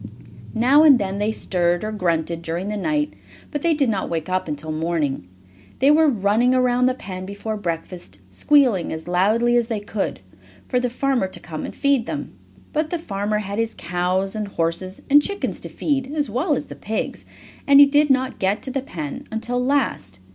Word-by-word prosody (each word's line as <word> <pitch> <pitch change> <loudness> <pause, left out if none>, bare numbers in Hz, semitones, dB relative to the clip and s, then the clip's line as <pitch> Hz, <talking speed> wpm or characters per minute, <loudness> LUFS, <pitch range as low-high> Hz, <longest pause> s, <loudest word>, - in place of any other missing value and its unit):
Now 255 +6 +5
and 295 -4 +8
then 200 -2 -3
they 210 +1 +1
stirred, 175 -4 0
or 215 - -3
grunted 170 -4 -1
during 170 +4 -3
the 210 - -2
night, 295 +8 -1 0.4
but 290 - -3
they 335 0 +2
did 285 -3 +2
not 205 -4 -1
wake 165 0 -3
up 185 -1 -1
until 150 +1 -4
morning. 155 - -2 0.5
They 275 +3 +4
were 315 +1 +5
running 225 +2 +2
around 250 0 +3
the 255 - +1
pen 185 -6 -7
before 205 +2 -4
breakfast, 170 - -5
squealing 245 - +3
as 160 +1 -6
loudly 215 +7 +2
as 235 -1 +1
they 225 -3 -2
could, 205 - -3 0.5
for 250 - +1
the 250 0 -1
farmer 255 -4 0
to 185 - -9
come 160 -3 -6
and - - -8
feed 280 -4 +1
them. - - -5 0.4
But 310 +1 0
the 345 - -1
farmer 210 -8 -2
had 205 0 -4
his 230 0 -1
cows 185 +3 -1
and 215 -1 -3
horses 185 +1 -2
and 290 +1 +6
chickens 400 +6 -3
to - - -6
feed, 270 -2 -2
as 290 -7 0
well 290 - +1
as - - -3
the - - -10
pigs, 220 +1 -4 0.4
and 280 0 +7
he 285 - +11
did 290 +1 +3
not 260 -1 +1
get 195 +3 0
to 265 - -4
the 270 +1 -2
pen 160 - -6
until 240 +3 -2
last. 250 - -1
215 Hz, 200 wpm, -22 LUFS, 180-265 Hz, 0.5 s, he